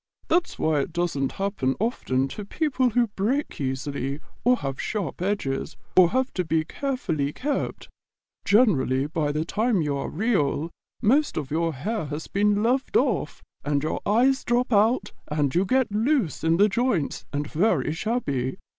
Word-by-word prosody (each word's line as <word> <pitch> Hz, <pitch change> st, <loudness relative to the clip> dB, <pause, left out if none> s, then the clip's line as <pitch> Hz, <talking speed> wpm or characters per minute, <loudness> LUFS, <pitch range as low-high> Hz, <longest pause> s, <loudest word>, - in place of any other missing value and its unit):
That's 350 Hz, +1 st, +1 dB
why 155 Hz, -2 st, +1 dB
it 150 Hz, +4 st, -3 dB
doesn't 170 Hz, -6 st, -1 dB
happen 195 Hz, -10 st, -1 dB
often 135 Hz, -, 0 dB
to 210 Hz, -, -6 dB
people 260 Hz, +2 st, 0 dB
who 240 Hz, 0 st, +2 dB
break 245 Hz, -, -1 dB
easily, 135 Hz, +1 st, -3 dB, 0.2 s
or 250 Hz, +1 st, +4 dB
have 135 Hz, -, -4 dB
sharp 195 Hz, -, -3 dB
edges, 170 Hz, -7 st, -2 dB, 0.2 s
or 185 Hz, -2 st, +7 dB
who 255 Hz, -, 0 dB
have 260 Hz, 0 st, 0 dB
to 180 Hz, -, -1 dB
be 160 Hz, -1 st, 0 dB
carefully 175 Hz, -, -2 dB
kept. 285 Hz, -, -3 dB, 0.6 s
Generally, 150 Hz, -, +3 dB
by 150 Hz, -3 st, 0 dB
the 155 Hz, +2 st, -1 dB
time 215 Hz, -1 st, +1 dB
you 145 Hz, -1 st, -1 dB
are -, -, -3 dB
Real, 170 Hz, -6 st, 0 dB, 0.3 s
most 280 Hz, +7 st, +3 dB
of 145 Hz, -3 st, -3 dB
your 165 Hz, 0 st, 0 dB
hair 210 Hz, -, -2 dB
has 150 Hz, +2 st, -5 dB
been 205 Hz, +1 st, +1 dB
loved 260 Hz, -, +2 dB
off, -, -, 0 dB, 0.2 s
and 145 Hz, -1 st, 0 dB
your 155 Hz, -, -2 dB
eyes 255 Hz, +6 st, +3 dB
drop 240 Hz, 0 st, +1 dB
out 220 Hz, +5 st, +3 dB, 0.2 s
and 150 Hz, -3 st, 0 dB
you 180 Hz, +3 st, +2 dB
get 255 Hz, +1 st, +2 dB
loose 225 Hz, -, 0 dB
in 165 Hz, +1 st, +3 dB
the 205 Hz, +3 st, +6 dB
joints 215 Hz, -, -1 dB
and 145 Hz, 0 st, -2 dB
very 155 Hz, -2 st, +1 dB
shabby. 145 Hz, -, -2 dB
185 Hz, 165 wpm, -25 LUFS, 145-235 Hz, 0.6 s, or